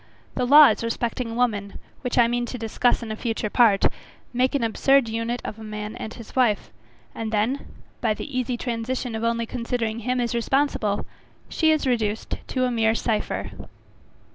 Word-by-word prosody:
The 250 -1 -1
laws 285 -5 +7
respecting 230 0 -2
woman, 210 -5 0 0.2
which 250 -2 -2
I 240 -1 +6
mean 240 0 -1
to 250 - -5
discuss 235 +2 +1
in 220 - -5
a - - -2
future 220 -2 -3
part, 220 -5 +4 0.5
make 255 +3 +1
an 275 - +1
absurd 270 +3 +3
unit 230 +2 -3
of 215 - -6
a - - -9
man 210 0 -6
and 220 - -6
his 230 -1 -11
wife; 240 -6 +2 0.4
and 225 -1 -4
then, 225 +6 0 0.3
by 220 -3 +1
the 285 +4 -7
easy 250 -1 -1
transition 240 +1 -3
of 220 0 -3
only 230 0 0
considering 230 -2 -2
him 250 +2 -1
as 240 -1 -1
responsible, 235 -4 0 0.4
she 320 - +2
is 310 -2 +1
reduced 225 -4 -1
to 255 -1 0
a 250 - 0
mere 225 -1 +2
cypher. 225 -2 -2
235 Hz, 175 wpm, -24 LUFS, 220-250 Hz, 0.5 s, laws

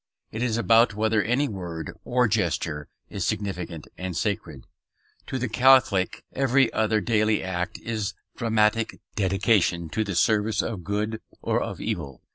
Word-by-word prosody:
It 110 - -5
is 120 -2 0
about 115 -1 +4
whether 110 0 +2
any 125 +7 +1
word 85 - -6
or 125 0 +2
gesture 85 -8 -1 0.2
is - - -3
significant 90 -6 -3
and 90 -2 -4
sacred. 85 - -3 0.6
To 130 - -3
the 125 0 -1
Catholic 115 -5 +4
every 135 -2 +3
other 110 -1 +2
daily 110 +1 +2
act 95 +2 -3
is 110 -3 -3 0.2
dramatic 110 -1 +1
dedication 95 -4 +1
to 110 +7 0
the 100 -3 -4
service 105 +3 +2
of 105 -6 -4
good 105 +4 -2 0.2
or - - +1
of - - -4
evil. 70 -7 -4
105 Hz, 145 wpm, -25 LUFS, 90-115 Hz, 0.6 s, about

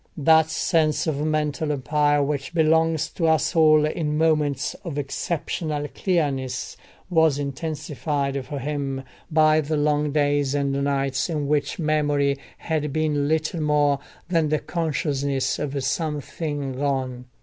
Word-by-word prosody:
That 160 +1 +5
sense 160 -2 +1
of 150 -3 -1
mental 155 0 0
empire 145 +1 +2
which 140 +3 -3
belongs 160 -1 +3
to 165 - 0
us 160 +2 +2
all 155 -2 +6
in 150 -1 -1
moments 150 -3 +1
of 165 -5 -5
exceptional 145 +1 -3
clearness 140 -8 -1 0.4
was 160 -4 +4
intensified 140 -1 -3
for 145 - -5
him 135 -1 -3 0.3
by 155 -1 +4
the 155 +1 -2
long 150 0 +1
days 145 -1 +1
and 140 -1 0
nights 140 +1 0
in 150 -4 -2
which 145 -1 0
memory 145 -3 +1 0.2
had 150 -2 -2
been 150 -1 0
little 160 +1 0
more 145 -2 +2 0.3
than 165 -3 +1
the 155 - +2
consciousness 145 -5 -1
of 140 -2 -3
something 145 0 -2
gone. 130 -2 -2
150 Hz, 130 wpm, -24 LUFS, 140-155 Hz, 0.4 s, all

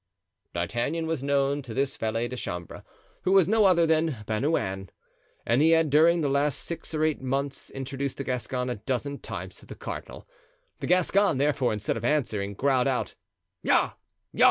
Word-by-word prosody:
D'Artagnan 120 - -1
was 160 -4 -2
known 140 0 +1
to 120 -5 -8
this 135 +1 0
valet 115 +1 -1
de 125 - -6
chambre, 90 -8 -6 0.4
who 185 - +1
was 190 -4 +6
no 220 0 +4
other 175 -3 +5
than 160 -3 +2
Bernouin, 105 - -1 0.6
and 120 +4 +3
he 160 - +5
had 160 -3 +1
during 165 +3 +5
the 145 - +1
last 140 0 +1
six 165 -1 -5
or 155 - +1
eight 155 -3 +1
months 135 +1 -2
introduced 135 0 -4
the 140 - -3
Gascon 125 0 -2
a 120 - -3
dozen 135 +5 -3
times - - -7
to - - -15
the - - -8
cardinal. - - -7 0.5
The - - -4
Gascon, 185 -1 +3
therefore, 140 -2 +2
instead 105 +1 -2
of 115 - -6
answering, 110 -8 0
growled 130 +1 +2
out 130 -2 -1 0.5
"Ja! - - +3
140 Hz, 175 wpm, -27 LUFS, 125-155 Hz, 0.6 s, was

